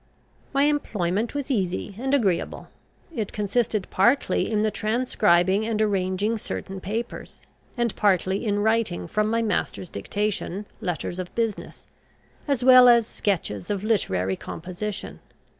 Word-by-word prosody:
My 275 0 +2
employment 225 -7 0
was 285 -1 -3
easy 195 -3 -1
and 265 +2 -2
agreeable. 195 -10 -1 0.5
It 215 -5 -2
consisted 210 0 0
partly 235 +4 +2
in 210 -1 +1
the 215 - +1
transcribing 205 -5 +2
and 220 -2 -1
arranging 205 +1 0
certain 195 -1 -5
papers, 225 +5 -5 0.3
and 235 -2 0
partly 190 -1 +1
in 205 -2 0
writing 220 -6 0
from 215 +4 0
my 230 +1 +1
master's 205 -4 -2
dictation 205 - -3
letters 180 0 -3
of 180 -1 -6
business, 225 -3 -3 0.6
as 275 -4 0
well 255 -1 +9
as 235 -2 +6
sketches 170 - -2
of 200 -1 -2
literary 95 - 0
composition. 185 - -6
210 Hz, 130 wpm, -25 LUFS, 185-230 Hz, 0.6 s, well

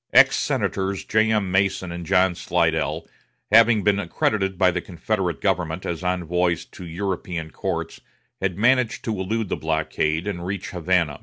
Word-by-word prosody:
Ex - - +7
Senators 95 0 -1
J.M. 110 -3 +2
Mason 95 -1 +1
and 85 -1 -6
John 90 +1 +3
Slidell, - - 0 0.4
having 115 -1 +6
been 100 -1 +3
accredited 95 +1 -1
by 90 0 +4
the 90 0 -2
Confederate 90 -3 -2
government 85 0 -1
as 85 +1 -4
envoys 90 -1 0
to 90 - -11
European 85 -2 -4
courts, - - -4 0.4
had 95 -2 -1
managed 120 +2 +2
to 110 - -2
elude 105 +2 -2
the - - -1
blockade 80 +1 -1
and 95 -4 -4
reach 95 +1 -4
Havana. 85 -4 0
95 Hz, 150 wpm, -23 LUFS, 85-100 Hz, 0.4 s, Ex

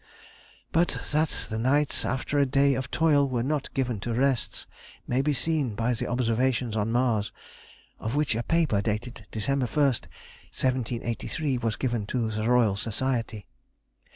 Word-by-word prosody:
But 170 +2 +2
that 155 +1 0
the 110 - -1
nights 140 +5 +2
after 135 +3 -1
a 140 - +5
day 140 +1 +3
of 130 0 -3
toil 150 -4 +3
were 120 -2 0
not 145 +1 -1
given 125 -5 0
to 115 +3 -3
rest, 135 0 0 0.4
may 125 +2 +1
be 150 +2 +1
seen 145 -4 0
by 115 +3 +1
the 115 - -3
observations 120 -1 0
on 110 +1 0
Mars, 115 -4 +1 0.7
of 110 +4 -3
which 150 -3 +2
a 115 - -1
paper, 155 -8 +2
dated 110 0 -4
December 130 +5 0
1, - - -13
1783, 130 0 -1
was 115 -2 -1
given 120 -5 -2
to 115 -2 -1
the 110 +1 -1
Royal 120 -5 +4
Society. 115 0 -2
125 Hz, 155 wpm, -27 LUFS, 115-140 Hz, 0.7 s, a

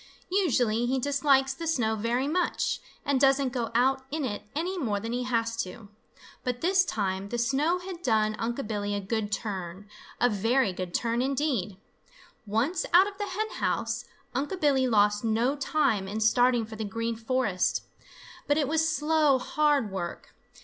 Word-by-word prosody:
Usually 245 - +2
he 265 +2 +1
dislikes 275 0 +2
the 330 +5 -6
snow 240 -9 +1
very 235 +5 0
much, 350 +4 0 0.3
and 275 -2 +1
doesn't 270 -1 +3
go 240 -3 -2
out 265 +2 +3
in 305 -1 -2
it 205 -5 -3
any 350 +5 -1
more 215 -9 -1
than 225 +3 -4
he 250 0 -2
has 230 -2 0
to. 210 +1 -5 0.5
But 250 -1 -2
this 375 +2 +4
time 195 - -2
the 240 - -2
snow 275 +8 +1
had 360 -1 -8
done 215 -6 +2
Unc' 240 +3 -2
Billy 205 -1 -2
a - - -1
good 205 +1 -2
turn, 195 -2 -4 0.3
a 245 - +4
very 225 0 +1
good 180 -1 -5
turn, 235 0 0
indeed. 260 -8 -1 0.7
Once 235 - 0
out 370 +2 +8
of 400 -1 -7
the 410 - -2
hen 435 +3 -3
house, - - -1 0.3
Unc' 290 +9 -2
Billy 275 -4 +3
lost 210 -2 +3
no 230 +5 +1
time 270 -8 +1
in 210 +3 -3
starting 240 +2 +3
for 220 0 -9
the 220 - -4
Green 230 +3 -2
Forest. 225 -5 0 0.6
But 290 - +3
it 295 -3 +1
was 320 +2 +2
slow, 300 -3 +3
hard 285 -4 +1
work. 175 -3 -5
245 Hz, 170 wpm, -28 LUFS, 215-285 Hz, 0.7 s, out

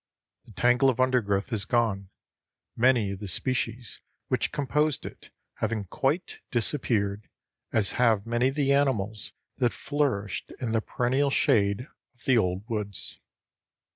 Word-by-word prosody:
The - - -15
tangle 125 +5 +4
of 130 - -1
undergrowth 120 -5 +1
is 105 -3 0
gone, 105 -4 0 0.7
many 120 -4 +3
of 100 - -6
the 105 - -6
species 120 +2 -2 0.3
which - - +1
composed 145 +2 0
it - - -10 0.3
having 110 -1 -1
quite 140 - -1
disappeared, 110 -5 -1 0.4
as 105 -4 +1
have 110 -5 +3
many 120 +2 +2
of 135 - -2
the 140 -2 +2
animals 110 -7 0 0.2
that 120 -3 +2
flourished 105 - -2
in 120 -3 -2
the 115 -1 +2
perennial 130 +5 +1
shade 115 -4 +2 0.3
of 120 - -20
the 130 - +4
old 95 +1 -1
woods. 105 -4 -5
115 Hz, 140 wpm, -27 LUFS, 100-130 Hz, 0.7 s, tangle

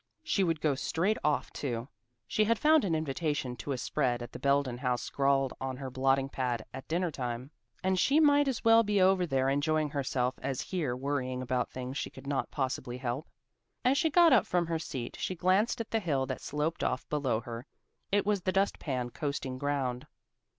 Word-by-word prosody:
She 200 -10 +1
would 165 -3 0
go 150 -2 +2
straight 170 +9 0
off 150 -1 0
too. 120 -3 -3 0.4
She 215 - +1
had 230 +1 +2
found 310 +5 +5
an 175 -5 +1
invitation 145 -4 -2
to 125 +7 -5
a 135 - -1
spread 125 -2 0
at 120 - -9
the - - -8
Belden 140 -3 +1
house 125 -2 0
scrawled 135 -1 +1
on 130 -1 -3
her 135 -1 -6
blotting 135 +1 +2
pad 125 -4 -2
at 135 - -8
dinner 170 +1 0
time, 125 0 -4 0.3
and 190 0 +2
she 280 - +4
might 290 -2 +5
as 265 -4 -1
well 225 0 +7
be 210 -2 +1
over 185 -1 +4
there 135 -3 +1
enjoying 150 +2 +1
herself 130 -3 -1
as 135 -2 -2
here 155 -10 -2
worrying 130 -1 -2
about 125 0 -1
things 130 +1 -5
she - - -3
could 130 - -13
not 140 -1 -1
possibly 130 -2 -3
help. 125 +4 -3 0.6
As 255 +2 +5
she 320 +3 +2
got 340 +1 +6
up - - +4
from 175 -1 +1
her 165 -1 -1
seat 125 -6 -5
she 185 - -2
glanced 185 +7 +2
at 230 - -5
the 225 - +2
hill 145 -9 0
that 130 -1 -5
sloped 150 +3 -2
off 125 - -1
below 135 -7 0
her. 120 +3 -7 0.4
It 205 0 +2
was 205 -2 +1
the 185 - 0
dust 195 +2 +1
pan 125 -4 -3
coasting 135 -3 -3
ground. 135 -2 -1
140 Hz, 205 wpm, -30 LUFS, 130-180 Hz, 0.6 s, well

